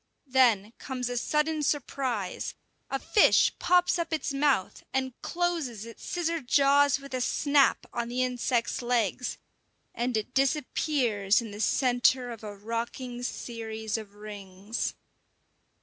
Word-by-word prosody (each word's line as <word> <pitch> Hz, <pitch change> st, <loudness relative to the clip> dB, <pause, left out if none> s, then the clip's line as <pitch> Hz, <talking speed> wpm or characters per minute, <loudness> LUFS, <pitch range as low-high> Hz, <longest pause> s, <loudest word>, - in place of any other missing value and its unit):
Then 240 Hz, -6 st, +3 dB
comes 250 Hz, -2 st, -3 dB
a 245 Hz, -, -3 dB
sudden 300 Hz, +4 st, 0 dB
surprise: 260 Hz, -8 st, -2 dB, 0.3 s
a 270 Hz, -, 0 dB
fish 410 Hz, +9 st, +4 dB
pops 360 Hz, 0 st, +3 dB
up 335 Hz, -, -2 dB
its 310 Hz, -2 st, -1 dB
mouth, 275 Hz, -8 st, +1 dB
and 260 Hz, -1 st, -1 dB
closes 330 Hz, -, -2 dB
its 230 Hz, -1 st, -11 dB
scissor 335 Hz, -2 st, -1 dB
jaws 280 Hz, +2 st, +4 dB
with 275 Hz, -1 st, -11 dB
a 255 Hz, -, -1 dB
snap 285 Hz, +2 st, +3 dB
on 235 Hz, -1 st, -2 dB
the 250 Hz, +1 st, 0 dB
insect's 250 Hz, -1 st, 0 dB
legs, 240 Hz, -1 st, 0 dB, 0.6 s
and 240 Hz, -1 st, -1 dB
it 215 Hz, -, -4 dB
disappears 260 Hz, -6 st, +1 dB
in 230 Hz, -3 st, -6 dB
the 205 Hz, -, -8 dB
centre 245 Hz, 0 st, +2 dB
of 225 Hz, -2 st, -9 dB
a 205 Hz, -1 st, -6 dB
rocking 235 Hz, +3 st, -4 dB
series 220 Hz, -3 st, -4 dB
of 210 Hz, -3 st, -6 dB
rings. 205 Hz, 0 st, -5 dB
250 Hz, 135 wpm, -28 LUFS, 225-280 Hz, 0.6 s, fish